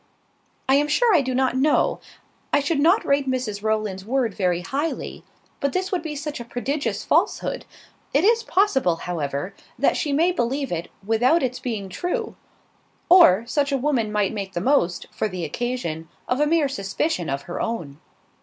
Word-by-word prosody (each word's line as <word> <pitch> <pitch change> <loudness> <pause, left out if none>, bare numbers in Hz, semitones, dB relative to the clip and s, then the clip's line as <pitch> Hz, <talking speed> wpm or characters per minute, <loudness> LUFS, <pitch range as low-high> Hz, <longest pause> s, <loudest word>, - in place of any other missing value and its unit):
"I 265 - +4
am 295 +1 +2
sure 450 +9 +3
I 330 - +5
do 260 -1 -2
not 260 -1 +1
know. 280 +4 +2 0.5
I 290 - +4
should 285 +1 0
not 345 +8 +4
rate 280 -1 +1
Mrs 240 -6 -2
Rowland's 215 -3 -1
word 240 0 0
very 180 -3 0
highly: 285 - -3 0.4
but 280 -1 -1
this 375 0 -1
would 365 -3 0
be 310 -2 -5
such 300 0 -5
a - - -5
prodigious 265 +5 -3
falsehood! - - 0 0.5
It 285 - +2
is 460 +3 +4
possible, 280 - +2
however, 160 -1 -4 0.2
that - - +2
she 300 - -1
may 325 +6 +3
believe 270 -2 -1
it 170 -1 -3 0.2
without 245 +9 +3
its 255 -1 -2
being 220 -6 -4
true. 355 - -3 0.7
Or, 230 - +7
such 280 +4 0
a 275 - +2
woman 250 -6 0
might 210 -1 0
make 195 -3 -5
the 175 - -1
most, 180 -6 +1
for - - -1
the 180 -3 -4
occasion, 165 -4 -3 0.2
of 250 - 0
a 295 - +3
mere 320 -2 +3
suspicion 195 - -2
of 140 +1 -2
her 175 - -5
own." 165 -12 -4
255 Hz, 180 wpm, -23 LUFS, 195-295 Hz, 0.7 s, Or